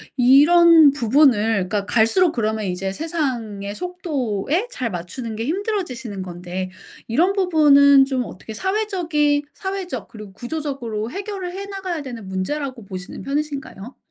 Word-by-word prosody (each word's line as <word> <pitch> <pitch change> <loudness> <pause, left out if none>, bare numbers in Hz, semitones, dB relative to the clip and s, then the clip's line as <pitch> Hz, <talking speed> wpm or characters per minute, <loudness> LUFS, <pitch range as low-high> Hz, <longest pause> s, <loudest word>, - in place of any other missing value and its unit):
이런 305 +5 +7
부분을 230 -7 +3
그러니까 200 -1 -2
갈수록 245 - +3
그러면 220 -3 -1
이제 190 +1 -3
세상의 235 -10 -3
속도에 335 - -2
잘 250 - -3
맞추는 215 +6 -6
게 225 - -3
힘들어지시는 310 - -3
건데 180 +1 -5 0.4
이런 345 +11 +2
부분은 285 -7 +5
좀 260 -2 -1
어떻게 220 +2 -9
사회적이 345 - 0
사회적 380 - -5
그리고 215 -4 -11
구조적으로 240 -3 -4
해결을 390 -2 -5
해 390 +2 -6
나가야 380 -5 -4
되는 235 -8 -8
문제라고 240 +5 -4
보시는 185 -1 -8
편이신가요? 275 -5 -4
270 Hz, 345 characters per minute, -21 LUFS, 215-335 Hz, 0.4 s, 이런